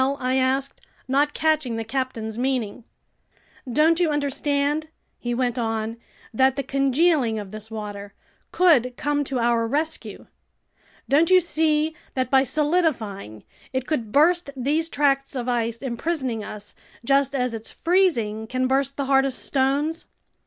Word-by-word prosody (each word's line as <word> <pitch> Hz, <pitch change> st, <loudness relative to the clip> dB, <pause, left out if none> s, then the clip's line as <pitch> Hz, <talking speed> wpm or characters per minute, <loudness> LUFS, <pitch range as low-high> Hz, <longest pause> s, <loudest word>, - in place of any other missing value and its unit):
I 260 Hz, -1 st, 0 dB
asked, 265 Hz, +1 st, 0 dB, 0.3 s
not 285 Hz, +3 st, +1 dB
catching 310 Hz, -6 st, +1 dB
the 225 Hz, -, -3 dB
captain's 225 Hz, -2 st, -3 dB
meaning. 245 Hz, -3 st, -2 dB, 0.9 s
"Don't 315 Hz, +5 st, +3 dB
you 345 Hz, -3 st, +2 dB
understand," 290 Hz, +1 st, 0 dB, 0.3 s
he 240 Hz, 0 st, -2 dB
went 245 Hz, 0 st, -1 dB
on, 225 Hz, 0 st, -2 dB, 0.4 s
"that 265 Hz, +3 st, +3 dB
the 275 Hz, -, -2 dB
congealing 275 Hz, -2 st, +2 dB
of 205 Hz, -3 st, -6 dB
this 215 Hz, 0 st, -8 dB
water 205 Hz, -2 st, -7 dB, 0.4 s
could 260 Hz, -9 st, +3 dB
come 290 Hz, 0 st, 0 dB
to 270 Hz, -1 st, -3 dB
our 235 Hz, -1 st, +1 dB
rescue? 310 Hz, +6 st, -3 dB, 0.8 s
Don't 310 Hz, +4 st, +3 dB
you 370 Hz, 0 st, +7 dB
see 315 Hz, -2 st, +1 dB, 0.2 s
that 255 Hz, -2 st, -1 dB
by 265 Hz, -1 st, +5 dB
solidifying, 260 Hz, -, -1 dB, 0.3 s
it 260 Hz, 0 st, -1 dB
could 240 Hz, -9 st, -2 dB
burst 340 Hz, +4 st, +3 dB
these 295 Hz, +6 st, 0 dB
tracts 275 Hz, -2 st, +1 dB
of 250 Hz, -1 st, -3 dB
ice 235 Hz, -1 st, -1 dB
imprisoning 255 Hz, -2 st, -2 dB
us, 205 Hz, 0 st, -8 dB, 0.3 s
just 275 Hz, +1 st, +2 dB
as 250 Hz, -2 st, 0 dB
its 225 Hz, -1 st, -6 dB
freezing 240 Hz, -, +1 dB
can 255 Hz, +2 st, -1 dB
burst 270 Hz, +1 st, 0 dB
the 280 Hz, -, -1 dB
hardest 270 Hz, -1 st, +1 dB
stones? 285 Hz, +4 st, 0 dB
265 Hz, 140 wpm, -23 LUFS, 235-295 Hz, 0.9 s, you